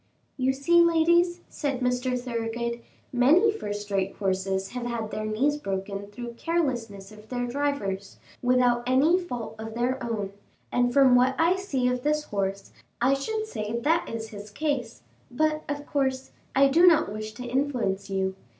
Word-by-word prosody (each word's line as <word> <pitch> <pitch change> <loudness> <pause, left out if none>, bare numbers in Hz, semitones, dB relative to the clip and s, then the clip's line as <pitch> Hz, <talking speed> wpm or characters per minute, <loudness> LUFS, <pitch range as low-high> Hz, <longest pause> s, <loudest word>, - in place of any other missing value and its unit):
"You 260 -1 +1
see, 280 +6 +4
ladies," 340 +1 +3
said 280 -4 -3
Mr. 250 0 0
Thoroughgood, 235 -1 -3 0.3
"many 305 - +5
first 205 - -5
rate 195 0 0
horses 190 0 -1
have 245 -1 -4
had 230 -3 -3
their 215 0 -3
knees 270 +8 +1
broken 195 -4 -4
through 235 +4 -7
the - - -9
carelessness 240 - -2
of 215 0 -15
their 245 -1 -2
drivers, 245 -8 -2 0.2
without 245 -1 +3
any 290 +8 +4
fault 245 -11 -5
of 220 0 -6
their 245 +2 -1
own, 210 -4 -3 0.4
and 245 0 +2
from 270 -1 +6
what 250 +1 +4
I 335 +3 +4
see 290 -10 -1
of 250 0 0
this 300 +2 +1
horse, 195 -5 -3 0.3
I 255 +3 +3
should 435 +11 -2
say 220 - -4
that 325 +7 +1
is 225 -1 -5
his 210 0 -9
case; 250 - -3 0.3
but, 310 +4 0
of 290 0 -3
course, 265 -2 -1 0.2
I 275 +1 +6
do 335 +6 +5
not 315 - +4
wish 215 0 -6
to 250 +2 -8
influence 240 -7 -1
you. 190 -1 0
245 Hz, 170 wpm, -26 LUFS, 215-285 Hz, 0.4 s, from